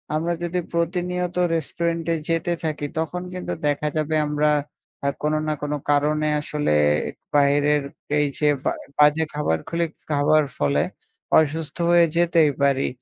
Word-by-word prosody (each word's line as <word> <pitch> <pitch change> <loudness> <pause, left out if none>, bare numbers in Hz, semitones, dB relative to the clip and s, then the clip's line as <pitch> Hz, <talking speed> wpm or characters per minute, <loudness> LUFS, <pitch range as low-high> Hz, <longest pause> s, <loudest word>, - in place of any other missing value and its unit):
আমরা 170 +2 0
যদি 175 +1 -1
প্রতি 170 +2 0
নিয়ত 180 0 -2 0.2
রেস্টুরেন্টে 165 +1 -1 0.2
যেতে 165 +1 +1
থাকি 150 -2 -2
তখন 175 +2 -3
কিন্তু 180 - -4
দেখা 145 +1 0
যাবে 155 0 0
আমরা 150 0 +2 0.6
আ - - +4
কোন 150 0 +1
না 155 - +1
কোন 145 0 -2 0.2
কারণে 150 +1 +2
আসলে 150 - -1 0.6
বাহিরের 145 +1 +3 0.4
এই 145 - +2
যে 150 - +2 0.2
বা - - +1 0.3
বাজে 150 +2 +5
খাবার 80 - 0
গুলি 170 0 0 0.3
খাবার 150 +1 +4 0.2
ফলে 70 0 +2 0.6
অসুস্থ 160 +1 -2
হয়ে 170 -1 +6
যেতেই 165 -3 +4
পারি। 135 -1 +2
155 Hz, 145 wpm, -23 LUFS, 145-170 Hz, 0.6 s, হয়ে